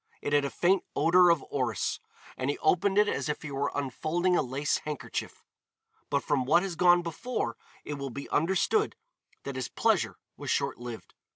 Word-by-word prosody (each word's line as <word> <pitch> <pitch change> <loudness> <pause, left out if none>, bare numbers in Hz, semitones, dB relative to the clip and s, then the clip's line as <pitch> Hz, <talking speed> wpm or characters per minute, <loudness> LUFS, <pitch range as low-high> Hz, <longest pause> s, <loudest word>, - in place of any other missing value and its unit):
It 145 - -3
had 145 -1 +4
a - - -1
faint 185 +5 +2
odor 180 +1 +5
of 170 -4 +2
orris, 125 -6 -1 0.4
and 130 +1 -2
he 145 - -1
opened 190 +5 +2
it 210 0 +5
as 140 -8 -1
were 145 -2 -2
he - - -6
unfolding 165 +7 0
a - - +3
lace 135 +2 -1
handkerchief. 150 -2 -5 0.7
But 140 -1 +1
from 145 -3 +1
what 170 +7 +4
has 190 -3 -3
gone 175 0 +5
before 165 - -3 0.3
it 150 - -4
will 140 0 -4
be 140 +3 -7
understood 190 - +1 0.5
that 140 - -5
his 130 -3 -2
pleasure - - +1 0.2
was - - -6
short - - 0
lived. 120 -2 -8
150 Hz, 180 wpm, -29 LUFS, 140-175 Hz, 0.7 s, odor